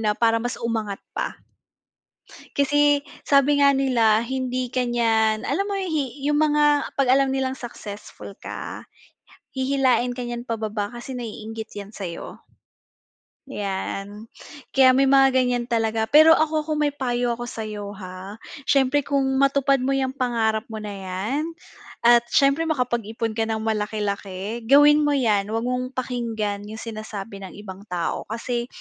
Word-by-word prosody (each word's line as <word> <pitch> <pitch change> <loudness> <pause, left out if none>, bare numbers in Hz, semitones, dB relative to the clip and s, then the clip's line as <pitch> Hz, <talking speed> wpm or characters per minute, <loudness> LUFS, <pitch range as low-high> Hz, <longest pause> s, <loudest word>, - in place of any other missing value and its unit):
na 210 -1 0
para 230 -1 +3
mas 245 +2 -3
umangat 220 -4 -2 0.2
pa. - - -3 1.2
Kasi 290 0 +3 0.2
sabi 285 +1 +3
nga 280 -1 +5
nila, 230 -5 +3
hindi 255 0 -3
ka 250 -1 0
niyan, 225 -2 +2
alam 395 +1 -1
mo 400 - -2
hi 315 -10 -2
'yung 295 +1 +2
mga 295 -1 +3
'pag 265 -2 +3
alam 270 0 +4
nilang 265 0 -1
successful 210 -6 -9
ka, - - -6 0.7
hihilain 260 -2 +1
ka 250 - -4
niyan 240 +1 -6
pababa 215 -2 -2
kasi 240 +3 -8
naiinggit 225 -2 -6
'yan 205 +1 -7
sa'yo. 180 -5 -7 1.1
'Yan, 205 -1 -4 0.5
kaya 265 -1 +7
may 270 +2 +4
mga 270 0 +6
ganiyan 245 -1 0
talaga, 225 -1 0
pero 315 +2 +8
ako 310 -1 +1
kung 305 -1 0
may 295 - +2
payo 245 -3 -1
ako 240 +1 -3
sa'yo, 210 -3 -6
ha, 185 0 -8 0.3
siyempre 275 +1 +2
kung 280 -1 +1 0.2
matupad 275 0 +3
mo 265 +2 0
'yang 265 -1 0
pangarap 230 -5 0
mo 220 -1 -7
na 210 - -5
'yan 200 +9 -3 0.6
at 235 0 +6
siyempre 275 +6 +3
makapag-ipon 235 -6 -1
ka 225 - +1
ng 220 -1 -2
malaki-laki 210 0 -3
gawin 290 +3 +7
mo 290 - +2
'yan, 215 -7 +2
huwag 225 +2 -2
mong 250 +1 -2
pakinggan 225 -5 -3
'yung 220 +1 -8
sinasabi 215 -2 -7
ng 190 -2 -9
ibang 200 -1 -10
tao. 175 -3 -3
Kasi 235 +2 -3
240 Hz, 150 wpm, -23 LUFS, 215-270 Hz, 1.2 s, pero